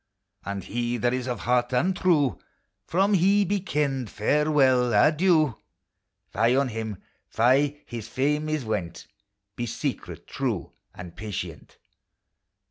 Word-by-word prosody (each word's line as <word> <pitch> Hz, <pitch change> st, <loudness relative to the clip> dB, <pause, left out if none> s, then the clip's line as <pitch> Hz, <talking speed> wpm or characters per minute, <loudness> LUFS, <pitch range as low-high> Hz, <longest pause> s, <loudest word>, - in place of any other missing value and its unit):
And 100 Hz, -1 st, -5 dB
he 120 Hz, +4 st, -2 dB
that 120 Hz, +2 st, +1 dB
is 130 Hz, 0 st, -2 dB
of 120 Hz, -6 st, -3 dB
heart 125 Hz, +3 st, +1 dB
untrue, 170 Hz, -2 st, +2 dB, 0.5 s
From 195 Hz, +4 st, +2 dB
he 200 Hz, +2 st, +4 dB
be 200 Hz, +2 st, 0 dB
ken'd 140 Hz, -, -1 dB
farewell! 130 Hz, -1 st, +2 dB
adieu! 155 Hz, -, +3 dB, 0.7 s
Fie 115 Hz, +4 st, +3 dB
on 135 Hz, -1 st, +2 dB
him! 110 Hz, -3 st, -5 dB, 0.3 s
fie! 140 Hz, +5 st, +2 dB
his 115 Hz, -2 st, -7 dB
fame 150 Hz, +5 st, 0 dB
is 155 Hz, -5 st, -2 dB
went: 105 Hz, -6 st, -4 dB, 0.5 s
Be 120 Hz, -, -3 dB
secret, 115 Hz, -, -5 dB
true -, -, -3 dB, 0.2 s
and 90 Hz, -2 st, -10 dB
patient! 90 Hz, -7 st, -7 dB
130 Hz, 125 wpm, -25 LUFS, 115-150 Hz, 0.7 s, he